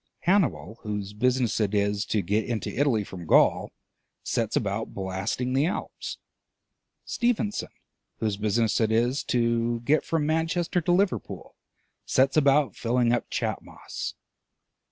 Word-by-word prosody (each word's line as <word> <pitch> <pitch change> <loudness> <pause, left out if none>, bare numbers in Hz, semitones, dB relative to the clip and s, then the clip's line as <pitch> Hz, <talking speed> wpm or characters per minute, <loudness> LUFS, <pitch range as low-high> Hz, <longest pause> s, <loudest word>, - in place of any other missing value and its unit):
Hannibal, 170 - +1
whose 105 -2 -4
business 125 +2 +1
it 105 -1 0
is 100 0 +1
to 105 -3 0
get 105 +5 +1
into 115 -3 -3
Italy 125 -6 +2
from 90 -4 -9
Gaul, - - +4 0.5
sets - - -1
about - - -2
blasting 95 +6 -2
the 140 +4 +3
Alps. 180 - -5 0.9
Stephenson, 230 -4 -1 0.5
whose 110 -2 -1
business 110 +2 +1
it 110 -1 +2
is 120 +5 +1
to 115 -1 +1
get 145 +6 +2
from 160 -3 0
Manchester 165 +3 0
to 170 - 0
Liverpool, 185 +1 -1 0.5
sets 135 +1 +2
about 145 -1 +3
filling 120 0 +1
up 120 - -1
Chat - - -2
Moss. - - -7
120 Hz, 135 wpm, -26 LUFS, 105-150 Hz, 0.9 s, Gaul